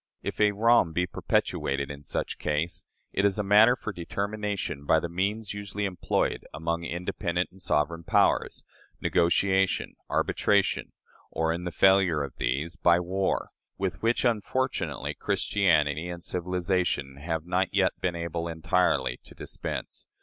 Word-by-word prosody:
If - - -3
a 105 - +6
wrong 110 -5 +4
be 90 +2 +1
perpetrated, 70 -5 -1
in 70 0 -9
such - - -3
case, 75 +3 -1 0.3
it 100 - +1
is 100 0 +3
a 105 - 0
matter 105 +5 +6
for 110 -4 -6
determination 100 -3 -3
by 80 - +5
the 85 - -3
means 100 +6 -2
usually 100 0 -4
employed 90 -3 -1
among 85 +2 -2
independent 90 +1 -2
and 95 +1 -16
sovereign 85 +2 0
powers - - +2 0.4
negotiation, 95 +2 +2 0.2
arbitration, 100 -2 +1 0.4
or, 80 0 0
in 85 +1 -5
the 90 - -2
failure 95 -5 +4
of 70 -3 -8
these, 75 +8 -1
by 85 0 +4
war, 95 +2 -1 0.3
with 90 -3 -3
which, 115 +3 +1
unfortunately, 125 +3 -1
Christianity 80 -4 +1
and 85 0 -6
civilization 90 -6 -1
have 80 +2 -3
not 90 +1 0
yet - - +3
been 90 -2 0
able 85 0 -3
entirely 80 -6 +1
to - - -13
dispense. - - -6
90 Hz, 140 wpm, -27 LUFS, 80-100 Hz, 0.4 s, a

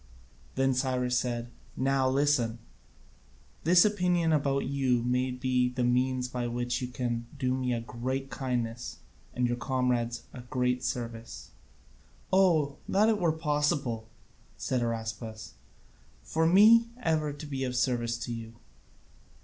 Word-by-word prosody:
Then 135 0 +2
Cyrus 125 -1 0
said, 120 -1 -3 0.3
"Now 135 0 +2
listen: 130 -4 +2 1.1
this 175 +3 +6
opinion 180 -5 +2
about 140 -2 +1
you 130 -3 +1
may 125 +1 +1
be 125 0 +1
the 125 0 -2
means 125 +1 +1
by 125 -1 -3
which 120 +1 -2
you 125 - -2
can 120 -2 -3
do 130 -2 0
me 130 -1 -1
a 120 -1 -1
great 130 +4 -4
kindness 120 -3 -3 0.4
and 125 0 +1
your 120 0 -1
comrades 120 -1 -1
a 125 - -8
great 125 +1 -1
service." 115 - -5 0.8
"Oh, 165 -7 +3
that 210 +3 +4
it 215 -2 +2
were 170 -2 +3
possible!" 145 -7 -1 0.5
said 130 -2 -1
Araspas, 110 -1 -4 0.7
"for 160 - +1
me 220 +6 +7
ever 155 -2 +1
to 145 +2 -8
be 135 -2 -3
of 125 -1 -2
service 120 -2 0
to 120 - -4
you!" 115 0 -7
125 Hz, 135 wpm, -29 LUFS, 120-140 Hz, 1.1 s, me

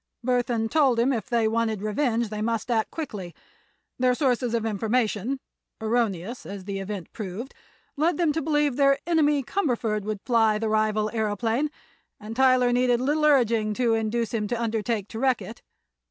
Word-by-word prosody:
Burthon 245 -3 +1
told 270 -3 +3
him 255 +4 +3
if 230 -1 -4
they 230 -2 +2
wanted 220 -2 -1
revenge 230 +1 0
they 215 0 -4
must 230 +2 -1
act 220 -2 +1
quickly. 205 - -6 0.6
Their 250 0 +3
sources 245 -4 +1
of 225 -1 -1
information—erroneous, 225 -1 -2
as 195 -2 -8
the 195 -1 -4
event 195 -3 -6
proved—led 245 - -4
them 340 -3 +2
to 320 - -1
believe 295 -3 +1
their 275 -1 +4
enemy 300 -4 +2
Cumberford 240 - -1
would 210 -2 -4
fly 225 -3 +3
the 220 0 -2
rival 215 0 +1
aëroplane, 225 +5 0 0.5
and 215 +2 -8
Tyler 255 -1 +4
needed 245 -1 +2
little 295 +4 +1
urging 230 -7 +3
to 240 -1 +2
induce 225 +1 -1
him 215 -2 -1
to 240 +2 -2
undertake 220 -2 -1
to 225 - -6
wreck 260 -1 +2
it. 230 - -9
230 Hz, 160 wpm, -25 LUFS, 215-255 Hz, 0.6 s, their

